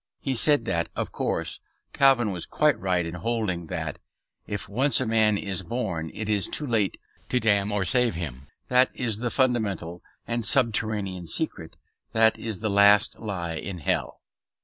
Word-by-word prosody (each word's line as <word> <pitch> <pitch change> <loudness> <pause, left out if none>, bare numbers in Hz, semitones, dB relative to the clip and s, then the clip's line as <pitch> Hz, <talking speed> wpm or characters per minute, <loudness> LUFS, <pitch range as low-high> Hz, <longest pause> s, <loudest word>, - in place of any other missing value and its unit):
He 135 - -2
said 140 0 +3
that, 85 -6 -1
of - - -3
course, - - -2 0.3
Calvin 130 -6 +4
was 90 -3 -3
quite 150 -2 +2
right 90 -3 0
in 85 - -5
holding 95 -2 -2
that - - -4 0.5
"if 105 -1 -4
once 130 +8 +4
a 130 - 0
man 110 -2 +3
is 100 -3 -2
born 95 -10 -3
it 110 - -4
is 105 -2 +1
too 150 - -2
late 110 -7 0 0.3
to 125 - +2
damn 100 -2 +2
or 105 -2 0
save 120 +1 +2
him." 70 -5 -6 0.2
That 125 +1 +4
is 115 -5 -2
the 120 +1 -1
fundamental 105 - 0 0.2
and 120 0 -2
subterranean 110 -7 +1
secret; 80 - -2 0.4
that 110 0 +3
is 110 -4 -5
the 110 - -1
last 100 +2 +5
lie 90 -6 -4
in 90 +3 -5
hell. 75 - -2
105 Hz, 170 wpm, -26 LUFS, 90-120 Hz, 0.5 s, last